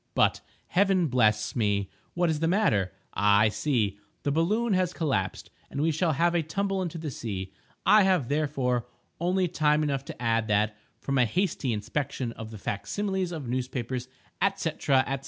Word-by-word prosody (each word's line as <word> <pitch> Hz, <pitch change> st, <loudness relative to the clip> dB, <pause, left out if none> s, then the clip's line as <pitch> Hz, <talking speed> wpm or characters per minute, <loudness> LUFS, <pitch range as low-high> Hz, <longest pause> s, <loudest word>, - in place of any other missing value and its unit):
—But, -, -, +3 dB, 0.3 s
Heaven 190 Hz, -1 st, +3 dB
bless 110 Hz, -4 st, +2 dB
me! 100 Hz, -4 st, +1 dB, 0.3 s
what 175 Hz, 0 st, +2 dB
is 155 Hz, -, -1 dB
the 165 Hz, -, +1 dB
matter? 135 Hz, -, +2 dB, 0.2 s
Ah, 100 Hz, 0 st, +4 dB
I 110 Hz, -, +5 dB
see—the 105 Hz, 0 st, -2 dB
balloon 205 Hz, +9 st, +1 dB
has 185 Hz, -1 st, +1 dB
collapsed, 135 Hz, -, -2 dB, 0.2 s
and 140 Hz, -, -5 dB
we 160 Hz, +2 st, +2 dB
shall 160 Hz, +1 st, +1 dB
have 170 Hz, +4 st, +2 dB
a 170 Hz, -, +2 dB
tumble 195 Hz, +5 st, -1 dB
into 175 Hz, -2 st, -3 dB
the 155 Hz, -3 st, -4 dB
sea. 95 Hz, -6 st, -5 dB, 0.3 s
I 215 Hz, 0 st, +7 dB
have, 185 Hz, -9 st, +3 dB
therefore, 140 Hz, -5 st, 0 dB, 0.3 s
only 180 Hz, +2 st, +1 dB
time 155 Hz, -2 st, +2 dB
enough 140 Hz, -2 st, -1 dB
to -, -, -8 dB
add 115 Hz, -2 st, +1 dB
that, 105 Hz, 0 st, +2 dB, 0.2 s
from 135 Hz, -1 st, -1 dB
a 125 Hz, -, +5 dB
hasty 170 Hz, -, 0 dB
inspection 125 Hz, +3 st, -2 dB
of 110 Hz, -1 st, -8 dB
the 110 Hz, -, -8 dB
fac 100 Hz, 0 st, -4 dB
similes 190 Hz, -3 st, -1 dB
of 155 Hz, -7 st, -5 dB
newspapers, 125 Hz, 0 st, -3 dB, 0.5 s
&c., 165 Hz, -, -1 dB
&c. 135 Hz, -2 st, +3 dB
140 Hz, 175 wpm, -27 LUFS, 115-175 Hz, 0.5 s, I